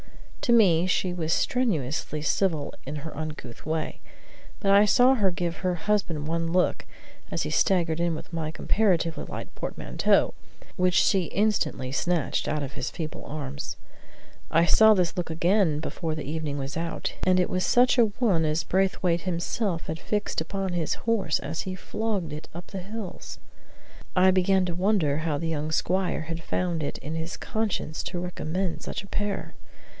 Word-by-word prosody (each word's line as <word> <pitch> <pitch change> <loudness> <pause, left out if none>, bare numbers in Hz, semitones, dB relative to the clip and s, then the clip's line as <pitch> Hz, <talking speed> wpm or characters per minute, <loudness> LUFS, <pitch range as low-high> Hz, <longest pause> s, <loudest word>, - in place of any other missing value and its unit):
To - - +1
me 185 -7 +5
she 185 -1 +1
was 165 -2 -2
strenuously 155 - 0
civil 155 -3 0
in 150 +2 -4
her 160 - -6
uncouth 150 -6 -7
way. 160 0 -2 0.6
But 195 - +2
I 200 +1 +7
saw 245 +5 +6
her 205 -7 +3
give 175 -1 -2
her 180 -1 0
husband 175 -5 -1
one 165 0 -1
look, 180 +1 +1 0.4
as - - -1
he - - -3
staggered 170 -4 +2
in 170 -1 +1
with 160 - -9
my 160 -2 -2
comparatively 170 -1 +1
light - - -7
portmanteau, - - +1 0.4
which 180 -1 +2
she 190 -1 +4
instantly 170 -10 0
snatched 170 +2 0
out 150 -1 -1
of 140 - -5
his - - -3
feeble 155 -2 -6
arms. 145 -1 -5 0.7
I 165 +1 +4
saw 220 +4 +7
this 180 -3 +1
look 175 -2 -2
again 170 -1 +2
before 160 0 -3
the 155 - -5
evening 150 -2 -3
was 135 0 -4
out, 165 0 -3
and 185 0 +4
it 180 - +2
was 185 0 0
such 250 +1 +4
a 235 - +7
one 205 -6 +1
as 155 +1 +1
Braithwaite 185 -2 +1
himself 180 0 -1
had 160 +1 -4
fixed 210 -4 -1
upon 190 +2 -3
his 170 -3 0
horse 205 -9 +2
as 155 +4 -4
he 185 -1 -4
flogged 195 -5 -3
it 150 - -8
up 175 0 -7
the 195 - -6
hills. 200 +1 -7 0.8
I 185 0 +6
began 185 0 +3
to 175 -2 -3
wonder 180 -6 +2
how 155 -2 -1
the 165 - -3
young 155 -1 -2
squire 185 +3 +1
had 165 +1 -5
found 175 -2 -1
it 145 - -3
in 150 - -6
his 160 +1 -4
conscience 210 -8 -2
to 180 - -3
recommend 180 0 -3
such - - -5
a - - -12
pair. 205 0 -3
175 Hz, 175 wpm, -26 LUFS, 155-195 Hz, 0.8 s, I